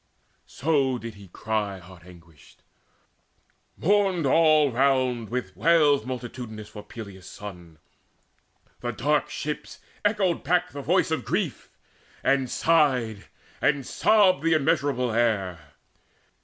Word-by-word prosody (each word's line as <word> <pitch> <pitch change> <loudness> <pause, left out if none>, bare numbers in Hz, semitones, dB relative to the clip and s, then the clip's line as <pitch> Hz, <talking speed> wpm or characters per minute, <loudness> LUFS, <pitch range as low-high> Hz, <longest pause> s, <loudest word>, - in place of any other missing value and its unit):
So 135 -3 0
did 115 -1 -7
he 100 -1 -14
cry 105 +1 -3
heart 90 -1 -15
anguished. 85 -4 -18 1.1
Mourned 195 -3 +2
all 155 0 +4
round 130 -3 +1
Wails 130 - +2
multitudinous 120 -4 -7
for 105 - -9
Peleus' 100 -3 -10
son: 90 -6 -10 1.0
The 120 -1 -4
dark 145 +8 0
ships 150 0 -5 0.3
echoed 200 -4 +1
back 180 +4 +1
the 140 - -6
voice 180 +3 +1
of 155 -6 -1
grief, - - -2 0.5
And 135 -2 +2
sighed 130 -12 +1 0.3
and 140 -3 +1
sobbed 195 -9 +3
the 165 +1 +2
immeasurable 135 -4 +1
air. 95 -10 -1
125 Hz, 110 wpm, -25 LUFS, 105-155 Hz, 1.1 s, all